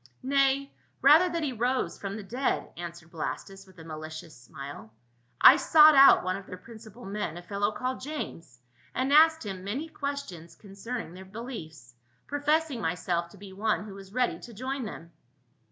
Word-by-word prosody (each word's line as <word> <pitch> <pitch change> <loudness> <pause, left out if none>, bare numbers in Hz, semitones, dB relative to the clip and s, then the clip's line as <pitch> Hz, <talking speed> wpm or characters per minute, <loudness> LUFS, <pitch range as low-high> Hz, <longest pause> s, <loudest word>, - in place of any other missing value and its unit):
" 120 - -39
Nay 275 +1 +2 0.3
rather, 310 +6 +7
that 335 -1 -2
he 275 -4 -1
arose 250 +3 -1
from 195 0 -5
the 215 - -7
dead," 245 +7 -2
an 175 0 -5
swered 170 0 -17
Blastus 195 +4 -6
with 190 -1 -19
a 165 - -11
malicious 155 0 -8
smile. 135 -1 -10 0.3
" 120 0 -40
I - - +10
sought 310 -1 +7
out 275 -1 +8
one 185 0 -1
of 195 - -9
their 185 - -8
principal 225 +3 -13
men, 195 -5 -4
a 175 - -9
fellow 205 +3 -1
called 255 +3 -4
James, 215 - -7 0.4
and 265 +2 0
asked 320 -2 +6
him 190 -2 -6
many 250 +11 -4
questions 280 - -6
concerning 205 0 -7
their 185 +1 -10
be 195 +3 -12
liefs, 160 - -8 0.3
professing 290 -2 0
myself 170 0 -1
to 200 - -16
be 195 0 -11
one 210 +2 0
who 205 - -9
was 195 -1 -12
ready 250 +2 0
to 235 - -11
join 260 +3 -4
them." 170 -5 -9
205 Hz, 185 wpm, -28 LUFS, 175-270 Hz, 0.4 s, I